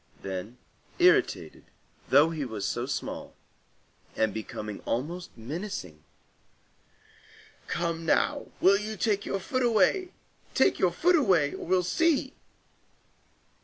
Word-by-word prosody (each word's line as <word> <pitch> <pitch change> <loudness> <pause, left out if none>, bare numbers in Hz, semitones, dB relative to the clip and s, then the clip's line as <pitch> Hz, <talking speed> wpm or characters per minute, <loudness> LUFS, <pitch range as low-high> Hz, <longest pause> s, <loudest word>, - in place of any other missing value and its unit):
Then 95 +5 -5 0.4
irritated, - - +2 0.5
though 145 +4 +5
he 155 -3 -3
was 110 -6 -4
so 120 +4 -2
small, 140 - -5 0.8
and 110 -2 +1
becoming 105 -1 -6
almost 165 +9 -3
menacing:— 115 - -6 1.6
"Come 170 -1 -2
now, 280 - +1
will 200 +1 +5
you 215 +1 -5
take 205 -1 0
your 195 - -1
foot 255 +7 -2
away? 250 - +2 0.4
Take - - +3
your - - +4
foot 355 +1 +3
away, 185 - +3
or - - -7
we'll 180 0 +3
see!" 290 - +1
170 Hz, 115 wpm, -28 LUFS, -, 1.6 s, though